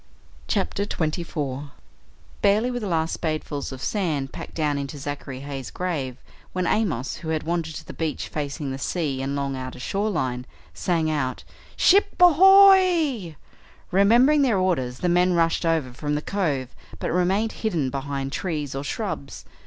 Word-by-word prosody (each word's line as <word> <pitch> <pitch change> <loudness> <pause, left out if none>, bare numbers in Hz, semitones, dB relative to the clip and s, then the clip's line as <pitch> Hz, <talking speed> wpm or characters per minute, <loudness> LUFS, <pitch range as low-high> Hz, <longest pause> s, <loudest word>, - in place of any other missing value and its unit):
CHAPTER 200 -1 0
24 150 -5 -3 0.7
Barely 210 +5 +3
were 245 - -2
the 210 - -4
last 165 -2 -1
spadefuls 155 -3 -3
of 130 0 -8
sand 155 -10 -1
packed - - -8
down 150 -3 0
into 140 +1 -5
Zachary 140 -2 -6
Heigh's 135 -3 -6
grave 145 -9 -3 0.4
when 185 -1 -1
Amos, 165 - 0
who 160 - -7
had 160 -1 -1
wandered 165 -1 -2
to - - -8
the - - -9
beach 160 -2 -3
facing 145 -1 -4
the 135 - -5
sea 145 -5 -2
and 135 +1 -2
long 140 -1 -2
outer 130 -1 -6
shoreline, 140 -9 -2 0.3
sang 165 -3 0
out: 130 -4 -2 0.3
"Ship 395 +1 +4
ahoy!" 355 - +6 0.6
Remembering 235 +10 +5
their 245 -7 +3
orders 155 -10 0
the 180 - -1
men 180 +1 +3
rushed 165 0 +2
over 155 -7 0
from 150 +3 -2
the 150 - -1
cove 145 -11 -1 0.3
but - - -3
remained 190 +5 +1
hidden 165 - -1
behind 140 0 -3
trees 150 -6 -3
or 135 +1 -4
shrubs. 145 -5 -5
160 Hz, 155 wpm, -24 LUFS, 140-195 Hz, 0.7 s, ahoy